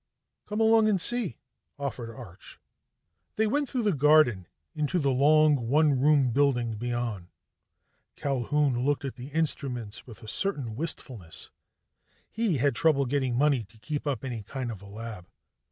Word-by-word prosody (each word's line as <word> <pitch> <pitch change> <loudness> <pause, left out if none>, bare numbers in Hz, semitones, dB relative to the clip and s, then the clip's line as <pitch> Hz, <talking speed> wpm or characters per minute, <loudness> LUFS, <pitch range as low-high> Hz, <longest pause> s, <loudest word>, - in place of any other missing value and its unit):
"Come 210 +1 -3
along 225 0 +5
and 200 -3 +2
see," 240 +1 +1 0.4
offered 135 -4 -5
Arch. 110 -6 -13 0.8
They 220 - +2
went 285 +6 0
through 250 -3 -1
the 210 - +2
garden 145 - +4 0.3
and 155 - -6
into 150 +5 0
the 140 -5 +1
long 145 -1 +4
one 145 0 +3
room 140 -2 +4
building 125 -3 +1
beyond. 120 -5 -3 0.9
Culquhoun 135 -1 0
looked 145 +1 0
at 135 - -4
the 125 +1 -9
instruments 135 -8 -2
with 115 -3 -12
a - - -10
certain 135 - -2
wistfulness; 115 - -4 0.8
he 220 -8 0
had 140 +1 +2
trouble 140 0 +3
getting 130 -2 0
money 140 -2 +2
to 110 +3 -22
keep 145 +7 -5
up 135 -2 -2
any 120 -4 -4
kind 125 +3 -5
of 105 -4 -9
lab. 105 -2 -9
135 Hz, 155 wpm, -27 LUFS, 120-155 Hz, 0.9 s, along